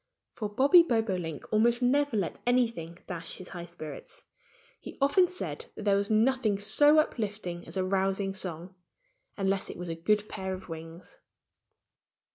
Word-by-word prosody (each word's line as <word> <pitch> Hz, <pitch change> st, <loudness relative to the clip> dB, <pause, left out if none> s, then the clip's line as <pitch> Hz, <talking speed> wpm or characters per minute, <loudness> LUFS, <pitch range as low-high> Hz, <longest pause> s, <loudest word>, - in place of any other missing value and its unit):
For 210 Hz, -2 st, -4 dB
Bobby 275 Hz, -, +6 dB
Bobolink 195 Hz, -, -1 dB
almost 235 Hz, +3 st, +3 dB
never 280 Hz, -1 st, +2 dB
let 195 Hz, -, -2 dB
anything 230 Hz, -10 st, +1 dB
dash 170 Hz, -2 st, -6 dB
his 185 Hz, -, -10 dB
high 175 Hz, -2 st, -7 dB
spirits. 155 Hz, -4 st, -9 dB, 0.6 s
He -, -, -10 dB
often 290 Hz, +7 st, +4 dB
said 370 Hz, +6 st, -6 dB
that 210 Hz, -, -7 dB
there 200 Hz, -1 st, +4 dB
was 200 Hz, 0 st, 0 dB
nothing 220 Hz, -1 st, +2 dB
so 290 Hz, +10 st, +5 dB
uplifting 210 Hz, -, -1 dB
as -, -, -5 dB
a 185 Hz, -, +1 dB
rousing 195 Hz, +1 st, 0 dB
song 180 Hz, -1 st, -5 dB, 0.6 s
unless 195 Hz, -1 st, 0 dB
it -, -, -7 dB
was 175 Hz, 0 st, -6 dB
a 165 Hz, -, -3 dB
good 210 Hz, +5 st, +1 dB
pair 190 Hz, -2 st, -4 dB
of 185 Hz, -, -11 dB
wings! 165 Hz, +1 st, -9 dB
200 Hz, 155 wpm, -29 LUFS, 180-240 Hz, 0.6 s, Bobby